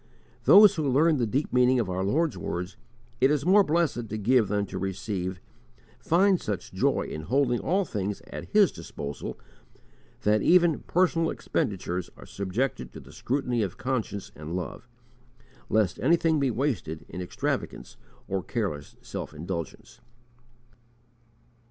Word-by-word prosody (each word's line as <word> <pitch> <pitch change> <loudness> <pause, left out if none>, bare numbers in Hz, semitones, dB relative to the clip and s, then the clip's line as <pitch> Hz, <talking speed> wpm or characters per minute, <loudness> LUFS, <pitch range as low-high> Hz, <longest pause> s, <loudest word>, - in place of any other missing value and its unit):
Those 205 0 +9
who 150 -3 0
learn 150 +4 +4
the 120 -3 0
deep 135 +8 -1
meaning 125 0 +4
of 115 - 0
our 95 +1 -2
Lord's 155 - +1
words, 90 +2 -4 0.4
"It 130 - +5
is 150 -1 +1
more 200 +3 +6
blessed 150 - 0
to 110 - -3
give 115 +1 +3
than 100 0 0
to - - -6
receive," 95 -1 -3 0.6
find 185 +2 +3
such 105 -3 -4
joy - - +1
in 75 - -6
holding 125 - +1
all 190 +3 +1
things 100 - -3
at - - -7
His 210 -3 +5
disposal 70 -4 -7 0.9
that 105 0 +3
even 175 - +4
personal 165 -2 +2
expenditures 90 -3 -2
are - - -12
subjected 100 - -3
to - - -8
the - - -14
scrutiny 125 -2 -1
of 95 -4 -3
conscience 115 -6 -3
and 80 +3 -6
love, 90 +5 -5 0.8
lest 105 -4 +1
anything 160 +4 +3
be 140 -2 +2
wasted 115 - -2
in 90 - -7
extravagance 90 - -4 0.3
or 95 -1 -1
careless 95 - -4
self - - -6
indulgence. 85 +2 -6
115 Hz, 145 wpm, -27 LUFS, 95-150 Hz, 0.9 s, Those